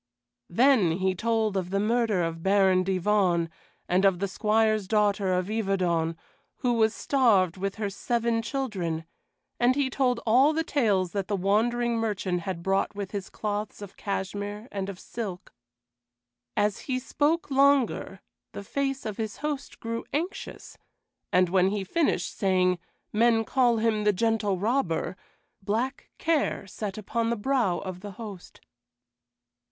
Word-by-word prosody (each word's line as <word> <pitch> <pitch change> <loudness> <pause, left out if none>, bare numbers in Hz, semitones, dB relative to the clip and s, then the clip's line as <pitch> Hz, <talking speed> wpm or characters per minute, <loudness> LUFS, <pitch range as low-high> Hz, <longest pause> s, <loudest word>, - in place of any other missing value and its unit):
Then 225 -4 +4
he 190 +2 0
told 220 +1 0
of 185 -2 -1
the 195 +1 0
murder 220 -3 +1
of 165 0 -3
Baron 190 -1 +4
Divonne, 185 -3 +1 0.4
and 180 +2 +2
of 195 -2 +4
the 200 +2 -1
Squire's 215 +1 +1
daughter 205 -2 +2
of 180 0 +1
Yverton, 185 -6 0 0.4
who 245 -2 0
was 225 -1 +2
starved 210 - +3
with 195 +1 -3
her 210 -2 -3
seven 235 +2 0
children; 195 - -3 0.5
and 245 +2 +4
he 275 -2 0
told 250 -2 +1
all 260 +7 +5
the 325 +1 0
tales 205 - +1
that 195 -2 -2
the 205 - 0
wandering 230 +5 +1
merchant 205 -5 -1
had 170 -1 -5
brought 195 +2 0
with 200 -2 -5
his 200 -2 -5
cloths 210 0 -4
of 205 -2 -9
cashmere 205 +2 -4
and 195 -1 -3
of 190 -2 -7
silk. 200 -6 -6 1.0
As 205 -1 +1
he 255 - +1
spoke 290 +5 0
longer, 270 -8 +2 0.3
the 200 - -6
face 270 +4 -2
of 215 -2 -4
his 220 -2 -4
host 290 -2 -4
grew 230 0 -4
anxious, 335 +7 -5 0.5
and 180 0 +4
when 185 +1 +3
he 200 0 -1
finished, 310 - 0
saying, 185 -2 +2 0.3
"Men 225 +1 +4
call 245 -2 +3
him 220 -1 +1
the 210 0 +3
Gentle 215 -1 +1
Robber," 195 -4 0 0.5
black 230 +7 -2
care 320 -9 0
sat 200 +1 -5
upon 230 +2 -1
the 235 - +1
brow 230 -5 +1
of 185 -2 -6
the 205 +1 -8
host. 200 -3 -10
210 Hz, 150 wpm, -27 LUFS, 190-235 Hz, 1.0 s, all